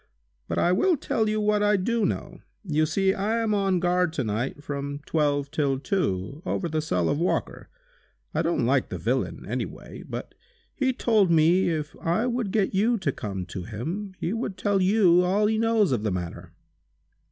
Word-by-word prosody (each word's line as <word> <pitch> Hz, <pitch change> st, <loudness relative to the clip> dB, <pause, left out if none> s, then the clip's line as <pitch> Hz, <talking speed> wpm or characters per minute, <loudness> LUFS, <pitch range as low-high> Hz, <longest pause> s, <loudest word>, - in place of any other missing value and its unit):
But -, -, -3 dB
I 175 Hz, -, +3 dB
will 335 Hz, -, +3 dB
tell 220 Hz, -4 st, 0 dB
you 215 Hz, 0 st, 0 dB
what 210 Hz, 0 st, +2 dB
I 210 Hz, 0 st, +3 dB
do 220 Hz, +2 st, +1 dB
know. -, -, -4 dB, 0.2 s
You 155 Hz, -4 st, +1 dB
see 190 Hz, +4 st, +2 dB
I 210 Hz, +4 st, -1 dB
am 225 Hz, -2 st, 0 dB
on 195 Hz, -3 st, +2 dB
guard 180 Hz, -1 st, +1 dB
to 140 Hz, -, -1 dB
night 120 Hz, +7 st, -3 dB
from 140 Hz, 0 st, -4 dB
twelve 145 Hz, -2 st, 0 dB
till 140 Hz, -3 st, 0 dB
two, 140 Hz, -, -2 dB
over 180 Hz, -, -2 dB
the 155 Hz, -1 st, -1 dB
cell 90 Hz, -, 0 dB
of 145 Hz, -, 0 dB
Walker. 175 Hz, -, -2 dB, 0.6 s
I -, -, +1 dB
don't -, -, 0 dB
like -, -, +2 dB
the -, -, -4 dB
villain -, -, -2 dB
any -, -, -2 dB
way, -, -, -11 dB
but, -, -, -6 dB, 0.4 s
he 265 Hz, -2 st, +1 dB
told 220 Hz, -6 st, +2 dB
me 170 Hz, +3 st, +4 dB
if 155 Hz, -2 st, -3 dB
I 175 Hz, +8 st, +1 dB
would 245 Hz, -4 st, -1 dB
get 205 Hz, -2 st, +1 dB
you 225 Hz, +5 st, +2 dB
to 170 Hz, -8 st, -1 dB
come 95 Hz, -6 st, -5 dB
to 95 Hz, -, -4 dB
him, 175 Hz, -, -5 dB
he 175 Hz, -, -2 dB
would 225 Hz, -4 st, -3 dB
tell 200 Hz, -2 st, +1 dB
you 185 Hz, -2 st, +5 dB
all 195 Hz, +4 st, +2 dB
he 220 Hz, +1 st, +1 dB
knows 225 Hz, -5 st, +3 dB
of 120 Hz, -5 st, +1 dB
the 105 Hz, -1 st, -1 dB
matter!" 90 Hz, -2 st, -5 dB
180 Hz, 195 wpm, -26 LUFS, 145-210 Hz, 0.6 s, you